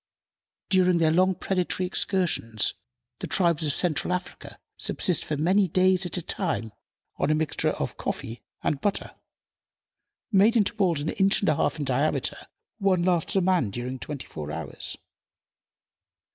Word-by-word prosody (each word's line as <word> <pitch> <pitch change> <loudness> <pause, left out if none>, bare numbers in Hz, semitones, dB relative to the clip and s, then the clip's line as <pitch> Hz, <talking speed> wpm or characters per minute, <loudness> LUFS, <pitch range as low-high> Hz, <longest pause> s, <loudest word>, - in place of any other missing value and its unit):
During 185 -2 +4
their 160 -2 +3
long 185 +3 +3
predatory 185 0 -1
excursions 175 - 0 0.5
the - - -4
tribes 170 -4 +2
of 150 - +2
Central 175 +3 0
Africa 180 0 -5 0.2
subsist 180 - +1
for 150 - -3
many 185 +6 +3
days 185 +1 +3
at 175 - -4
a 180 - -4
time 135 - -2 0.5
on - - 0
a 155 - +3
mixture 155 -1 0
of - - -3
coffee 115 +2 -4 0.2
and 140 - -1
butter. 205 -1 -1 1.2
Made 210 +3 +5
into 210 0 +2
balls 180 -8 +1
an 155 - -2
inch 195 +1 +2
and 200 - +2
a - - +3
half - - 0
in 145 - -3
diameter, 135 +1 0 0.3
one 190 -3 +2
lasts 175 -1 +1
a 195 - +4
man 180 - +2
during 125 +5 -5
twenty 145 -1 -6
four 75 -1 -7
hours. 80 -2 -4
175 Hz, 155 wpm, -26 LUFS, 145-185 Hz, 1.2 s, Made